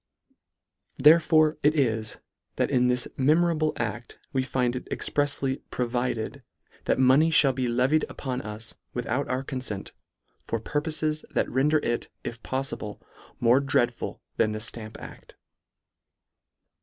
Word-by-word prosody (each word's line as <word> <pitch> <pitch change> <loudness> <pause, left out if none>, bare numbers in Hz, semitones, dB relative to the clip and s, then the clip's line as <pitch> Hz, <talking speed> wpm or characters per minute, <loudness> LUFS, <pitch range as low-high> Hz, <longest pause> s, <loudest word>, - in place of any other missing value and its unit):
Therefore 155 +1 +5
it 150 +2 +3
is, 110 -5 0 0.4
that - - 0
in 125 -2 +3
this 125 0 +1
memorable 155 +2 +3
acl: 115 +1 -4 0.2
we 130 - +2
find 125 -1 0
it 125 - -6
exprefsly 140 -2 -1
" - - -46
provided" 120 -2 -2 0.4
that - - +2
money 130 +5 +5
{hall 145 -4 +5
be 130 -1 -1
levied 130 +6 +2
upon 130 -2 -4
us 105 +2 -7 0.2
without 125 +3 -1
our 130 +1 -1
confent, 130 -8 -4 0.6
for 115 - -1
purpofes, 155 +4 -1
that - - 0
render 145 +5 +3
it, 120 0 -1
if 115 0 -6
poffible. 130 -5 -4 0.4
more 120 +2 +5
dreadful 125 -3 -1
than 110 - +2
the 110 - -3
Stamp 110 0 -5
act. - - -12
130 Hz, 130 wpm, -26 LUFS, 120-145 Hz, 0.6 s, Therefore